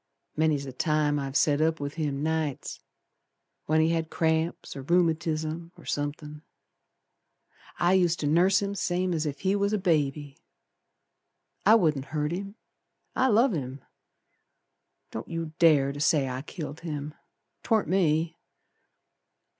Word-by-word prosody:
Many's 155 -2 +1
the 135 - -7
time 150 +1 +1
I've 135 +1 -1
set 150 0 +2
up 160 0 +1
with 145 0 -4
him 145 -3 -2
nights 160 -3 -2 0.9
When 155 +1 +3
he 160 - +3
had 165 -1 -1
cramps, 160 +1 -1
or 135 - -6
rheumatizm, 165 0 0
or 170 - -15
somethin'. 150 +1 -4 1.4
I 175 +2 +3
used 175 -3 +3
ter - - -2
nurse 180 +6 +3
him 200 0 -2
same's 175 -4 -1
ef 145 -1 -5
he 190 +1 +1
was 200 +1 0
a - - +3
baby. 150 -6 -1 1.3
I 220 - +8
wouldn't 155 -10 +2
hurt 150 +1 -2
him, 195 +3 -5 0.6
I 260 - +3
love 235 +1 +4
him! 135 -3 -5 1.3
Don't 110 - -6
you 165 -2 -4
dare 150 -5 +5
to 145 - -8
say 145 -2 +2
I 130 0 -4
killed 155 0 -7
him. 150 -3 -5 0.5
'Twarn't 220 -6 +1
me! 165 -2 +1
160 Hz, 140 wpm, -27 LUFS, 145-175 Hz, 1.4 s, I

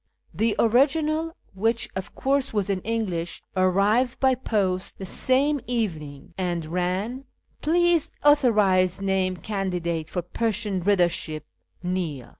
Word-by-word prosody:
The 215 +5 +1
original, 310 +7 +2 0.2
which, 225 +4 0
of 190 +1 -6
course, 275 0 +1
was 200 -1 +1
in 190 - 0
English, 190 -7 -3
arrived 200 +7 +2
by 265 -1 +4
post 200 -7 -1
the 190 - -6
same 270 +8 +1
evening, 160 - -3
and 175 -3 -1
ran 185 - -2
— - - -50
" - - -39
Please 345 0 +3 0.2
authorise 205 -11 +4
name 190 -2 0
candidate 175 -6 -3
for 180 - -3
Persian 210 +1 -1
readership, 175 -5 +1 0.4
Neil." 175 -8 -3
195 Hz, 125 wpm, -25 LUFS, 180-245 Hz, 0.4 s, by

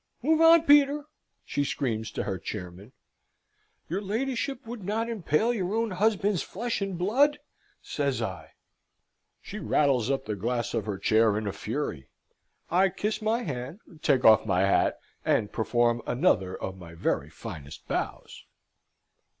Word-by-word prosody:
"Move 320 +3 +3
on, 330 0 +7
Peter," 290 -1 +5 0.4
she 145 - -1
screams 115 -6 -2
to - - -4
her 95 -3 -3
chairman. 95 +2 -7 1.0
"Your 185 +5 -2
ladyship 250 +5 -2
would 230 -2 -7
not 220 +4 -1
impale 220 0 +1
your 195 -2 -2
own 225 -1 0
husband's 200 -1 +1
flesh 230 +2 -3
and 195 -2 -2
blood!" 265 +11 +3 0.5
says - - -1
I. - - -5 0.9
She 210 - -7
rattles 140 - +2
up 135 -1 -1
the 105 - -3
glass 120 +3 -2
of 110 -3 -2
her 100 -2 -2
chair 110 +2 +3
in 110 - -3
a 100 - -2
fury. 105 - -4 0.6
I 190 +3 +4
kiss 210 +4 -3
my 225 +3 0
hand, 135 - -5 0.2
take 135 -5 +2
off 110 -1 +7
my 95 -4 +1
hat, 100 0 +2 0.3
and 105 - +1
perform 120 +1 +1
another 95 -6 +1
of 95 0 -5
my 85 -2 -11
very 75 -3 -1
finest 80 -6 -9
bows. - - -4
145 Hz, 150 wpm, -27 LUFS, -, 1.0 s, on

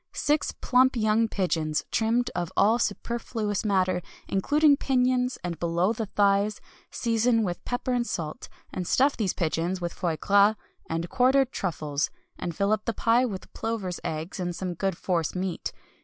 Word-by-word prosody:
Six 295 +1 +1
plump 255 +1 +4
young 220 0 +2
pigeons, 160 -7 -1
trimmed 235 +2 +1
of 175 -2 -3
all 220 +4 +4
superfluous 225 -4 -2
matter, 185 -3 +1 0.3
including 290 +9 +4
pinions 255 -1 +1
and 175 -2 -4
below 170 +5 +1
the 225 -1 -4
thighs. 200 +1 +2 0.3
Season 230 0 +1
with 175 -3 -3
pepper 245 +1 -2
and 240 -1 0
salt, 155 -3 -4 0.2
and 180 -2 -3
stuff 275 +2 +3
these 205 -6 -1
pigeons 170 +2 -1
with 175 -1 -3
foie 165 -3 -2
gras, 200 +4 +4 0.3
and 165 +1 -2
quartered 265 +4 +3
truffles, 150 -5 -2 0.3
and 170 -2 -5
fill 200 +3 +1
up 215 -1 0
the 230 - -1
pie 235 +2 +3
with 195 -6 -6
plovers' 215 -6 -3
eggs 160 +5 -4
and 175 -1 -2
some 180 0 -3
good 190 0 -2
force 170 -3 -1
meat. 185 -1 -3
200 Hz, 160 wpm, -27 LUFS, 175-235 Hz, 0.3 s, plump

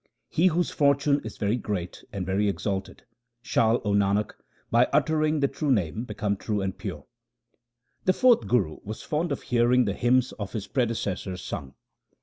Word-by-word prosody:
He 175 +4 +3
whose 175 0 +1
fortune 140 0 +3
is 110 - -8
very 105 +3 0
great 95 -6 -4
and 95 -3 -4
very 100 +2 +1
exalted, 95 -1 -3 0.4
Shall, 115 +2 +2
O 105 - +1
Nanak, 100 +1 +2 0.4
by 120 +2 +5
uttering 155 0 +2
the 140 - +4
true 140 +2 -3
Name 105 0 0
become 100 -4 -2
true 105 +1 -2
and 95 -1 -2
pure. - - -6 1.0
The 185 - +4
fourth 245 +2 +4
Guru 95 -11 +1
was 110 +2 -7
fond 160 +3 -1
of - - -3
hearing 125 +1 +3
the 100 - 0
hymns 125 +4 +2
of 100 -2 -5
his 105 -4 -3
predecessors 100 -7 -2
sung. 65 -1 -6
115 Hz, 165 wpm, -26 LUFS, 100-140 Hz, 1.0 s, by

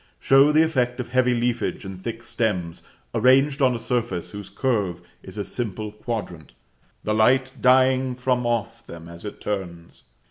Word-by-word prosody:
show 135 +2 +5
the 155 +1 +5
effect 125 -6 0
of 125 - -4
heavy 125 0 +2
leafage 120 -1 -1
and 95 -1 -8
thick 115 +2 -6
stems 110 -8 -2 0.3
arranged 135 +5 +3
on 130 -2 +3
a - - -2
surface 115 -6 -3
whose 100 -2 -8
curve 100 -5 -1 0.2
is 95 +2 -11
a 100 - -2
simple 105 0 -4
quadrant, 105 - -6 0.5
the 105 - 0
light 130 +4 +3
dying 130 0 +4
from 125 0 0
off 120 -2 -2
them 85 -1 -10
as 85 0 -10
it 105 - -7
turns. 85 -5 -6
120 Hz, 165 wpm, -23 LUFS, 100-130 Hz, 0.5 s, show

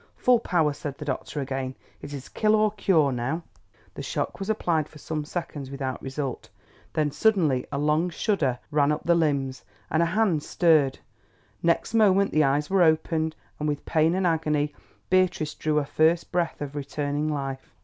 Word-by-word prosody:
"Full 250 -1 +4
power," 165 -8 +1
said 145 -1 -6
the 150 - -7
doctor 145 +1 -3
again. 135 -1 -3 0.3
"It 145 - -8
is 140 -2 -7
kill 215 0 +2
or 215 -1 +3
cure 165 -9 +2
now." 130 +7 -2 0.5
The - - -7
shock - - -3
was 195 - -4
applied 165 -8 0
for - - -14
some 155 +1 -4
seconds 150 -5 -5
without 135 -1 -4
result. 135 -1 -4 0.4
Then 150 -1 +1
suddenly 160 - +2
a - - -2
long 150 +4 +2
shudder 160 - 0
ran 145 0 +3
up 150 - -2
the 170 - +4
limbs, 140 - 0 0.3
and 160 - +3
a 170 - +3
hand 185 -4 +2
stirred. 150 -5 +3 0.6
Next 170 +5 +1
moment 200 -3 +4
the 155 - +3
eyes 145 +2 +1
were 195 -1 +2
opened, 160 -1 +2 0.2
and 150 0 0
with 145 -1 -3
pain 160 +1 +2
and 190 0 0
agony 150 -3 +1 0.4
Beatrice 180 -5 +2
drew 155 -1 -1
a 150 - +2
first 160 +4 +2
breath 170 -3 -1
of 145 0 -5
returning 145 +1 -2
life. 135 -2 -5
155 Hz, 180 wpm, -26 LUFS, 140-170 Hz, 0.6 s, Full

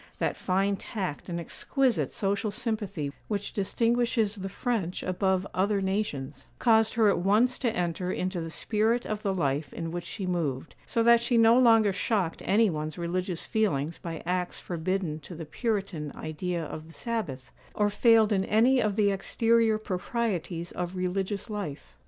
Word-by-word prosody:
That - - 0
fine 195 +2 0
tact 185 -7 -5
and 170 -1 -2
exquisite 255 +8 0
social 200 +2 -1
sympathy 205 - -3
which 205 -1 -3
distinguishes 230 +1 +1
the 195 -2 -5
French 195 -5 -2
above 190 +1 +1
other 200 +2 +1
nations, 190 -8 -3
caused 220 -2 +3
her 225 -2 +4
at 200 - +3
once 215 +7 +3
to 250 - +1
enter 180 -2 -2
into 185 -1 -2
the 165 - -5
spirit 220 +7 0
of 215 -1 -3
the 200 - 0
life 145 -5 -1
in 165 -1 -5
which 175 0 -4
she 195 - -5
moved; 165 -6 -2
so 230 - +1
that 235 0 +6
she 240 0 +1
no 230 0 +6
longer 225 -5 +5
shocked 195 -4 -1
any 215 +3 +4
one's 155 -3 -3
religious 180 0 -2
feelings 170 - 0
by 165 -2 -6
acts 180 0 -2
forbidden 175 -2 -2
to 170 +4 -10
the 160 0 -6
Puritan 195 - -2
idea 165 +2 -3
of 155 +1 -7
the 165 - -15
sabbath, 195 - -4 0.2
or 205 0 +2
failed 225 0 +5
in 190 -1 +2
any 245 +5 +4
of 210 -2 0
the 205 -2 +3
exterior 225 +3 +2
proprieties 185 -4 -3
of 180 +1 -4
religious 190 +3 -2
life. 155 - -6
195 Hz, 165 wpm, -28 LUFS, 170-220 Hz, 0.2 s, that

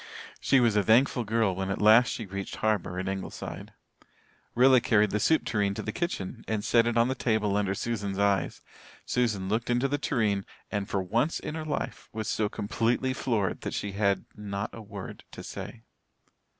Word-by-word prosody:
She 135 - +4
was 120 -4 +3
a 105 - +4
thankful 120 +5 +3
girl 110 -2 +1
when 95 +1 -3
at 100 - -2
last 110 +3 +7
she 115 - -3
reached 100 0 -5
harbour 105 -5 0
at 95 +1 -3
Ingleside. 95 0 -5 0.8
Rilla 130 +1 +6
carried 105 -3 +3
the 105 - 0
soup 160 +9 +3
tureen 100 -3 0
to - - -4
the - - -3
kitchen, 125 - -4
and 110 -2 -1
set 115 -1 +4
it 120 - 0
on 115 +1 +4
the 130 - 0
table 110 -5 0
under 100 -1 +1
Susan's 100 -3 -3
eyes. 100 -1 +1 0.4
Susan 110 -6 0
looked 110 +4 -1
into 120 +2 +2
the 145 +1 -1
tureen 105 -9 0 0.3
and 100 -2 -2
for 95 -2 0
once 120 - 0
in - - -5
her 160 -1 -4
life 150 - -4
was 110 -1 -4
so 105 -1 0
completely 115 +5 0
floored 115 -8 -1
that - - -4
she 100 - -3
had 100 0 +1
not 100 -1 -4
a 115 - -8
word 100 -2 -8
to - - -8
say. 115 0 -8
110 Hz, 190 wpm, -28 LUFS, 100-120 Hz, 0.8 s, last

